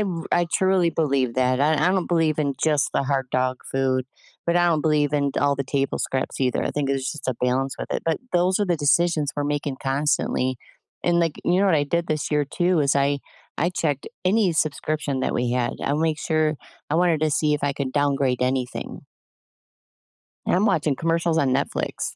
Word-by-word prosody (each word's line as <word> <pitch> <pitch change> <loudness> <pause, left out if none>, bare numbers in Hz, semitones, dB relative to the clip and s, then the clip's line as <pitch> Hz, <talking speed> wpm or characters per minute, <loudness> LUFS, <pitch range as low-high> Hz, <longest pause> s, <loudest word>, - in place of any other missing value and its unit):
I - - +3
r 175 -5 -3
I 175 -1 +3
truly 185 -3 +3
believe 140 -6 0
that. 130 0 +1
I 155 +2 +3
I 155 +4 +2
don't 190 -2 0
believe 165 -3 +1
in 140 -3 0
just 150 -2 +2
the 140 - +1
hard 135 -1 -1
dog 130 0 0
food, 130 -1 0 0.4
but 170 +1 +2
I 175 0 +4
don't 160 -3 +2
believe 150 -2 +1
in 140 -1 +1
all 140 0 +3
the 140 - -2
table 135 0 -1
scraps 130 +1 -3
either. 125 -2 +1
I - - -1
think 145 -2 -2
there's 135 -1 -1
just 145 -3 -7
a 130 - +1
balance 130 +1 0
with - - -5
it. - - -2
But 165 -1 0
those 180 +2 +2
are 205 - +2
the 175 - +1
decisions 155 0 +2
we're 145 - -1
making 145 -1 -2
constantly. 135 -2 0 0.5
And, 175 0 +3
like, 165 -3 0
you 180 +2 +3
know 200 - +3
what 180 - +4
I 145 - +1
did 170 +3 -1
this 155 -1 -2
year 150 -1 +2
too 175 +4 +1
is 140 0 +2
I 140 +1 +2 0.4
I 170 +3 +1
checked 150 -6 -2 0.2
any 195 -1 +3
subscription 150 -2 -1
that - - -1
we 120 0 0
had. 125 -1 0
I'll 145 +2 0
make 160 -1 0
sure 155 -1 +1 0.4
I - - +1
wanted 170 -2 +2
to 155 - +2
see 150 0 +2
if 145 - -4
I 140 - +1
could 135 -2 -4
downgrade 140 -3 +1
anything. 130 -1 -2 1.5
I'm 195 +5 +2
watching 155 -8 +1
commercials 165 0 0
on 140 -4 +2
Netflix 140 - -2
150 Hz, 210 wpm, -23 LUFS, 135-165 Hz, 1.5 s, I